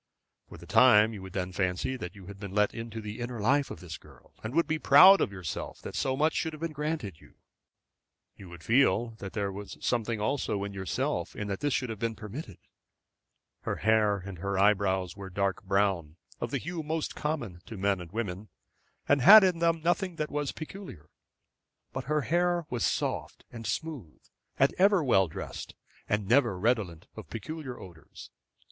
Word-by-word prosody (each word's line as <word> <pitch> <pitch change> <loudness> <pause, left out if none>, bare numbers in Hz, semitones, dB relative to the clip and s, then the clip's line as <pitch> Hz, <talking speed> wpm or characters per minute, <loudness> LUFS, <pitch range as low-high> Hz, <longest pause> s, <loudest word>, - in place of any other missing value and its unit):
For - - -11
the - - -12
time 110 0 +6
you 100 - -8
would 95 -1 -10
then 90 -1 -2
fancy 95 +7 -1
that 95 -6 -7
you 100 -2 -12
had 100 +1 -10
been 100 -1 -7
let 105 -1 +3
into 115 -1 -6
the 105 +1 -7
inner 120 -1 -4
life 140 +7 +2
of - - -8
this 80 -3 -8
girl, - - -19
and 110 +5 -5
would 170 - +4
be 155 0 -1
proud 185 +8 +8
of - - 0
yourself 95 -6 -6
that - - -7
so 130 0 -1
much 155 +2 +2
should 160 - -2
have 155 - -9
been 165 0 -3
granted 150 - -4
you. - - -19 1.0
You 95 -3 -12
would 85 -1 -12
feel 115 -2 +3
that 95 - -7
there 100 -2 -2
was 100 +1 -8
something 115 -2 -1
also 105 -3 -1
in 100 0 -5
yourself 95 -1 -2
in 105 - -4
that 95 - -3
this 145 -2 0
should 125 -3 -2
have 110 - -7
been 115 0 -2
permitted. 105 - -8 1.0
Her - - -2
hair 110 -2 +2
and 95 -2 -8
eyebrows 95 -2 +1
were 100 -1 -8
dark 95 0 -1
brown, 95 -6 0 0.2
of 120 - -3
the 140 - -1
hue 170 +5 -5
most 160 +1 -3
common 120 - -3
to 115 -3 -8
men 95 -1 0
and 85 -2 -10
women, 105 -2 -4 0.6
and 140 - +3
had 210 +7 +10
in 180 -3 +2
them 165 -1 +2
nothing 175 +1 0
that 155 -1 -3
was 145 -1 -2
peculiar; 160 - -10 0.8
but - - -4
her 150 +2 +1
hair 175 +5 +1
was 120 -3 -1
soft - - -2
and 115 -2 -7
smooth 140 - -5 0.4
and 135 - +3
ever 195 -2 +5
well 95 -8 +4
dressed, 80 - -7 0.3
and 105 -2 0
never 120 -5 +3
redolent 100 -6 0
of - - -10
peculiar 130 +3 -6
odors. 85 -4 -13
110 Hz, 190 wpm, -29 LUFS, 95-145 Hz, 1.0 s, had